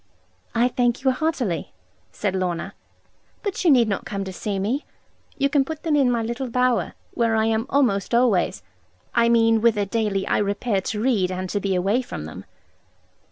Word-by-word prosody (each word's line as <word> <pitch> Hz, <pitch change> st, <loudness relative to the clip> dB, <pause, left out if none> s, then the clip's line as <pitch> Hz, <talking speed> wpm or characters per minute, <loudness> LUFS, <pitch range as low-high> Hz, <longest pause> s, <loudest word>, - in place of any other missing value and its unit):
'I 240 Hz, +2 st, +3 dB
thank 245 Hz, 0 st, 0 dB
you 265 Hz, -, +4 dB
heartily,' 255 Hz, -, -2 dB, 0.4 s
said 200 Hz, -3 st, -2 dB
Lorna; 180 Hz, -2 st, -2 dB, 0.7 s
'but 405 Hz, -2 st, -2 dB
you 350 Hz, -, +4 dB
need 245 Hz, -6 st, +5 dB
not 200 Hz, -, -2 dB
come 200 Hz, -1 st, -4 dB
to 190 Hz, -1 st, -6 dB
see 200 Hz, +2 st, -3 dB
me. 225 Hz, +10 st, -1 dB, 0.5 s
You 280 Hz, -1 st, +2 dB
can 280 Hz, -1 st, +2 dB
put 310 Hz, +2 st, -7 dB
them 315 Hz, -3 st, +1 dB
in 275 Hz, -3 st, +4 dB
my 235 Hz, -2 st, +1 dB
little 235 Hz, +3 st, -3 dB
bower, 250 Hz, 0 st, +1 dB, 0.2 s
where 230 Hz, -1 st, +1 dB
I 220 Hz, 0 st, +2 dB
am 225 Hz, +2 st, 0 dB
almost 235 Hz, -6 st, +1 dB
always 235 Hz, -, +2 dB, 0.5 s
I 235 Hz, 0 st, +3 dB
mean 225 Hz, -1 st, +4 dB
whither 220 Hz, -3 st, +3 dB
daily 205 Hz, -2 st, -1 dB
I -, -, +1 dB
repair 205 Hz, 0 st, 0 dB
to 210 Hz, +3 st, -3 dB
read 210 Hz, -6 st, +1 dB
and 185 Hz, 0 st, -3 dB
to 205 Hz, -, 0 dB
be 195 Hz, -1 st, -1 dB
away 195 Hz, +7 st, +1 dB
from 75 Hz, -, -7 dB
them.' 80 Hz, -, -9 dB
225 Hz, 185 wpm, -23 LUFS, 200-250 Hz, 0.7 s, need